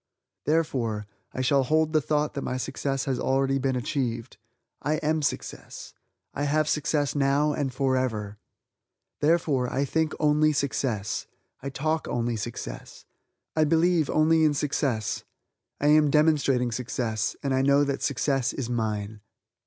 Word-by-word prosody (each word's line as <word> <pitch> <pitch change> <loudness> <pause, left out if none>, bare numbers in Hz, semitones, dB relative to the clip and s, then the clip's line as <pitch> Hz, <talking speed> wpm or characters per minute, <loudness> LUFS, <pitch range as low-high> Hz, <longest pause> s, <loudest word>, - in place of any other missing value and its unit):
Therefore, 125 -9 0 0.3
I 130 - -3
shall 135 +2 +3
hold 155 +4 +1
the 155 - +4
thought 150 +1 0
that 140 - -3
my 130 - -2
success 135 +1 -2
has 130 -3 -1
already 135 +1 +1
been 135 -1 0
achieved. 120 -3 -3 0.4
I 150 +2 0
am 155 +1 +1
Success, 145 - -4 0.4
I 145 - -2
have 155 +1 +1
success 150 -1 0
now 145 +1 +2
and 140 -3 -1
forever! 125 -6 -1 0.8
Therefore, 145 -5 +2
I 140 +2 0
think 160 +3 0
only 150 0 +3
success; 125 -7 -1 0.3
I 140 - -4
talk 155 +4 -1
only 120 -1 -1
success; 110 - -7 0.5
I 155 - +4
believe 165 0 +3
only 160 +1 +3
in 150 -2 +3
success; 135 -7 -1 0.6
I 145 - +2
am 150 -1 +5
demonstrating 140 -5 +3
success, 115 -2 -2
and 135 -1 0
I 130 - +2
know 140 +1 +4
that 140 -1 -2
success 135 -1 0
is 125 -3 -4
mine. 105 -2 -2
140 Hz, 145 wpm, -26 LUFS, 125-150 Hz, 0.8 s, am